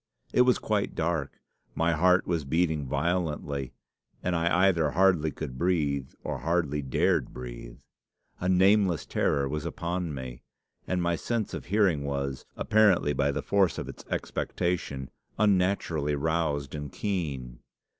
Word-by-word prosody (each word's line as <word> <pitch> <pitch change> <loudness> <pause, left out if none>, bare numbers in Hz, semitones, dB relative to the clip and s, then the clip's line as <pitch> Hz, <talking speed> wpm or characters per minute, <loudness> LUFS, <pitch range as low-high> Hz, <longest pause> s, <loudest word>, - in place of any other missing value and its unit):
It - - +5
was 125 0 +5
quite 105 -2 -1
dark. 80 -3 -2 0.4
My 80 +1 +2
heart 90 +3 +4
was 85 -3 -1
beating 80 -1 0
violently, 75 -3 -1 0.5
and 90 -1 0
I 85 +3 +3
either 85 -5 +2
hardly 90 -2 +3
could 65 -3 -6 0.7
or 75 -3 -3
hardly 75 0 0
dared 65 -2 +1
breathe. - - -8 0.6
A 90 - -1
nameless 95 -1 +4
terror 70 -1 +1
was 75 +2 -3
upon 85 0 -3
me, 65 -2 -7 0.5
and 90 -1 0
my 85 0 +1
sense 115 +4 -2
of - - -5
hearing 95 -7 +2
was, 70 -1 -3
apparently 100 -9 +3
by 70 0 +1
the - - -3
force 95 -4 +2
of - - -4
its - - -9
expectation, 85 -7 -2 0.3
unnaturally 90 -7 +2
roused 75 -2 -1
and 75 -2 -5
keen. 70 - -3
80 Hz, 135 wpm, -28 LUFS, 70-90 Hz, 0.7 s, It